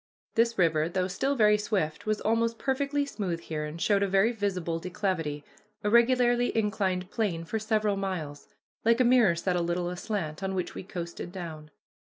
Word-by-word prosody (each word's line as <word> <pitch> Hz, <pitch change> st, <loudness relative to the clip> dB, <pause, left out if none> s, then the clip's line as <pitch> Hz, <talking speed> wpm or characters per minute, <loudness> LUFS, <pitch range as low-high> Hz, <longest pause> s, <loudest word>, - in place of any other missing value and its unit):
This 230 Hz, 0 st, +2 dB
river, 165 Hz, -3 st, +2 dB
though 185 Hz, +1 st, 0 dB
still 270 Hz, +9 st, -1 dB
very 210 Hz, -3 st, +4 dB
swift, 200 Hz, -6 st, -2 dB
was 215 Hz, -1 st, +1 dB
almost 230 Hz, +1 st, +1 dB
perfectly 280 Hz, +2 st, 0 dB
smooth 190 Hz, -11 st, -3 dB
here, 155 Hz, -2 st, -4 dB
and 150 Hz, +2 st, -7 dB
showed 200 Hz, +2 st, +2 dB
a 200 Hz, -, +2 dB
very 195 Hz, +4 st, +3 dB
visible 185 Hz, -7 st, -2 dB
declivity, 170 Hz, -5 st, -2 dB, 0.4 s
a 205 Hz, -, +1 dB
regularly 245 Hz, +1 st, +4 dB
inclined 195 Hz, -4 st, 0 dB
plane, 180 Hz, -8 st, -1 dB
for 220 Hz, +7 st, -2 dB
several 215 Hz, -2 st, +1 dB
miles, 165 Hz, -7 st, -4 dB, 0.4 s
like 230 Hz, +2 st, +4 dB
a -, -, +6 dB
mirror 240 Hz, -7 st, +5 dB
set 180 Hz, +2 st, -1 dB
a 175 Hz, -, +1 dB
little 175 Hz, +1 st, -1 dB
aslant, 180 Hz, -3 st, -4 dB
on 190 Hz, 0 st, -2 dB
which 180 Hz, -, -2 dB
we -, -, -6 dB
coasted 175 Hz, -2 st, -6 dB
down. 160 Hz, -5 st, -7 dB
195 Hz, 180 wpm, -28 LUFS, 170-225 Hz, 0.4 s, a